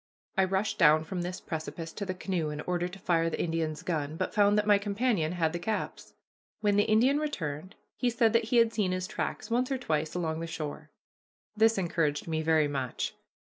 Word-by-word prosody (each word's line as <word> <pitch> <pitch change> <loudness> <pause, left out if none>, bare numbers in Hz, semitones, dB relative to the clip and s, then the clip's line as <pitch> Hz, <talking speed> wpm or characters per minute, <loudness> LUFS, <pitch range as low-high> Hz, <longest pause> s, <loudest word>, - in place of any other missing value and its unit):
I 190 - +4
rushed 195 +3 -1
down 155 -2 +6
from 180 +2 -4
this 180 +1 -4
precipice 160 +1 -6
to 200 - -5
the 185 - -2
canoe 180 -4 -2
in 150 0 -4
order 175 +1 -1
to 180 +2 -10
fire 165 -3 +1
the - - -4
Indian's 160 -2 -1
gun, 155 -3 -2
but - - -2
found 205 -1 +4
that 210 - +2
my 205 -1 +5
companion 200 -5 0
had 165 -2 0
the 175 - -2
caps. 215 +4 -4 0.4
When 205 -2 +2
the 205 - +4
Indian 250 +7 +4
returned 185 - -4 0.2
he 250 - +1
said 230 -2 +2
that 230 -1 +3
he 240 +2 +1
had 230 -1 +4
seen 200 -4 +1
his 185 0 -2
tracks 230 - -4
once 250 +3 +1
or 265 - +1
twice 155 -9 -2
along 160 -2 -1
the 165 - -4
shore. 155 -1 -6 0.7
This 225 0 +4
encouraged 165 -5 0
me 160 -1 -1
very 160 -1 +3
much. 135 -4 -3
180 Hz, 210 wpm, -29 LUFS, 160-210 Hz, 0.7 s, down